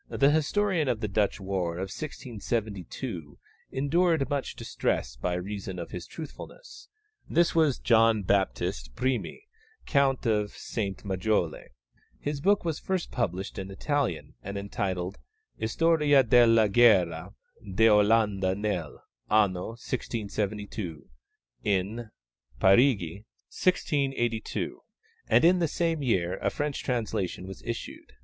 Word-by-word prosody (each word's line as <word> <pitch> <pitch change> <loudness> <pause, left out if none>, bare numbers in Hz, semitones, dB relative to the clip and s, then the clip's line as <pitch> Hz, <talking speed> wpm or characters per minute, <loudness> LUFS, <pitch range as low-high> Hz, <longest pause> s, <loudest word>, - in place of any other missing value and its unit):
The 140 +1 +3
historian 160 +1 +1
of 120 -4 0
the 110 - -2
Dutch 105 0 0
war 95 -3 -2
of 95 +3 -4
1672 110 - -5 0.3
endured 160 +2 +2
much 140 -2 -2
distress - - -2
by 90 +8 -2
reason 95 0 -5
of 85 - -6
his 90 -1 -6
truthfulness. 430 - -10 0.4
This 170 +1 +3
was 160 -6 +3
John 115 -2 +4
Baptist 90 -11 -1
Primi, 130 - -2 0.4
Count 135 -3 +2
of 105 -2 0
Saint 100 -3 -4
Majole. 95 -3 0 0.5
His 145 -1 -3
book 200 +2 +3
was 160 -2 -1
first 190 -2 -2
published 95 -6 -2
in 95 0 -6
Italian, 125 - -2
and 100 +8 -5
entitled 95 -2 -3 0.4
Historia 150 +3 +3
della 115 -2 +5
guerra 95 -7 +4 0.3
d'Olanda 105 -1 +3
nell' 100 -7 -3 0.3
anno 100 -4 +2 0.2
1672 105 - -4 0.6
(In 105 +3 -1 0.5
Parigi, 100 - +3 0.3
1682), 135 -10 -1 0.5
and 120 +7 +5
in 180 +1 +5
the 170 - +2
same 165 0 -1
year 95 -10 0
a - - 0
French 145 -1 -3
translation 110 -7 -2
was 95 0 -9
issued. 115 0 -6
110 Hz, 115 wpm, -28 LUFS, 95-140 Hz, 0.6 s, della